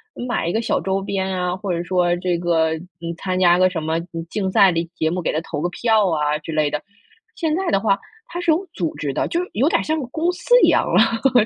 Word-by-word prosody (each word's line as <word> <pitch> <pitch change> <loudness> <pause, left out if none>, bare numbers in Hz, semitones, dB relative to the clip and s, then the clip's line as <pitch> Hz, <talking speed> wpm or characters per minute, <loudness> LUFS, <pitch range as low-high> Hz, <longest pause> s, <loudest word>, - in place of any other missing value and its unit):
嗯， 245 - -5
买 240 - -1
一 - - 0
个 220 - 0
小 230 - 0
周 190 0 0
边 195 -1 -2
啊， 180 0 -1
或 190 0 -4
者 170 0 -1
说 175 -1 +1
这 180 0 -1
个， 165 -2 +1
嗯， 170 0 -8
参 185 +2 -2
加 175 -1 +5
个 185 0 +5
什 175 -3 -4
么， 160 +1 0
嗯， 165 -1 -7
竞 195 -3 -2
赛 195 0 +6
的 165 -1 0
节 160 -2 0
目， 180 +1 -2
给 - - -1
他 155 - -1
投 155 - -5
个 175 - 0
票 220 0 +2
啊 150 -2 0
之 155 - -7
类 155 -1 +1
的。 150 - -2 0.5
现 320 -3 0
在 380 +1 -2
的 195 - +2
话， 200 -1 +1 0.3
它 355 -8 -5
是 345 - -2
有 340 +5 +2
组 170 - -3
织 140 -2 -3
的， - - -1
就 340 - -1
有 270 +8 +2
点 - - +2
儿 - - -3
像 315 +1 -1
个 265 - -5
公 320 +7 0
司 485 +7 +3
一 - - +7
样 - - +3
了， 230 +1 +3
185 Hz, 290 characters per minute, -21 LUFS, 170-230 Hz, 0.5 s, 一